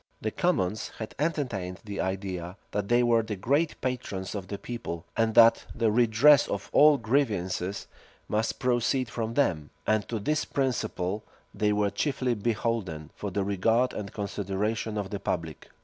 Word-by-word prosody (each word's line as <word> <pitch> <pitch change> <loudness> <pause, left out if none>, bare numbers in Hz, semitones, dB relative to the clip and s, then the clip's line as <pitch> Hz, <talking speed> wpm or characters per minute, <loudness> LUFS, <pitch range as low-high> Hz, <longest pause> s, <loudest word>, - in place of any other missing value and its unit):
[*] - - -40
The - - -1
commons 95 +4 0
had 110 - -6
entertained 120 - -2
the 100 -2 -5
idea, 95 -1 -3
that 105 -1 -2
they 120 +2 +4
were 120 -1 +4
the 110 -1 -4
great 140 - 0
patrons 120 -7 -3
of 100 -3 -5
the 100 - -4
people, 100 -10 -6
and 115 -1 +1
that 115 0 +6
the 115 -2 +2
redress 120 +5 +5
of 100 0 -4
all 150 0 +7
grievances 105 -7 -1 0.4
must 110 +2 -1
proceed 125 0 +1
from 115 -1 -3
them; 80 - +1 0.2
and 110 -2 +1
to 115 - -1
this 150 +9 0
principle 110 -7 -1 0.3
they 105 -1 +1
were 105 -1 +1
chiefly 130 -4 0
beholden 105 -8 -2
for 105 - -4
the 100 +1 -1
regard 110 +6 +2
and 100 -2 -5
consideration 105 +2 -2
of 100 -2 -3
the 100 - -3
public. 80 -4 -4
110 Hz, 165 wpm, -28 LUFS, 95-120 Hz, 0.4 s, all